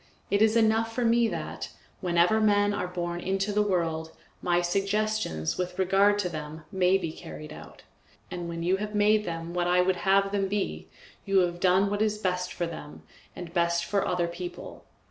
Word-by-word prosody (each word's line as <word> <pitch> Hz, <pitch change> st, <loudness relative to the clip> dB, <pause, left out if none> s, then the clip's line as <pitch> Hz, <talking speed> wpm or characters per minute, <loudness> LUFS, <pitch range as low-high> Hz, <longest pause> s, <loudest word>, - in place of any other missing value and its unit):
It 200 Hz, +1 st, +2 dB
is 220 Hz, 0 st, +4 dB
enough 225 Hz, 0 st, +3 dB
for 240 Hz, +1 st, -1 dB
me 230 Hz, 0 st, +4 dB
that, -, -, -5 dB, 0.3 s
wherever 180 Hz, +4 st, +3 dB
men 205 Hz, -1 st, +3 dB
are 200 Hz, -3 st, -2 dB
born 175 Hz, -1 st, -3 dB
into 195 Hz, +3 st, -1 dB
the 210 Hz, -, +3 dB
world, 165 Hz, -5 st, -1 dB, 0.3 s
my 175 Hz, -1 st, +2 dB
suggestions 195 Hz, -, -1 dB
with 180 Hz, 0 st, -3 dB
regard 195 Hz, +2 st, +3 dB
to -, -, 0 dB
them 155 Hz, -1 st, -7 dB
may 190 Hz, -1 st, +3 dB
be 170 Hz, -4 st, -4 dB
carried 155 Hz, -1 st, -9 dB
out, -, -, -12 dB, 0.5 s
and 175 Hz, -1 st, -5 dB
when 170 Hz, 0 st, -4 dB
you 185 Hz, +3 st, +2 dB
have 210 Hz, +1 st, -5 dB
made 210 Hz, +1 st, +3 dB
them 165 Hz, 0 st, -5 dB
what 175 Hz, 0 st, 0 dB
I 180 Hz, 0 st, +4 dB
would 185 Hz, 0 st, +1 dB
have 195 Hz, +2 st, +2 dB
them 200 Hz, -1 st, 0 dB
be, 190 Hz, -, -3 dB, 0.4 s
you 195 Hz, -1 st, +3 dB
have 175 Hz, -1 st, -1 dB
done 190 Hz, +2 st, +3 dB
what 205 Hz, 0 st, -1 dB
is 215 Hz, -1 st, +1 dB
best 180 Hz, -3 st, -2 dB
for 175 Hz, -, -2 dB
them 165 Hz, -3 st, -9 dB, 0.3 s
and 170 Hz, -2 st, -8 dB
best 170 Hz, -1 st, +1 dB
for 200 Hz, +2 st, 0 dB
other 175 Hz, -1 st, 0 dB
people. 175 Hz, +1 st, -8 dB
185 Hz, 190 wpm, -27 LUFS, 175-205 Hz, 0.5 s, is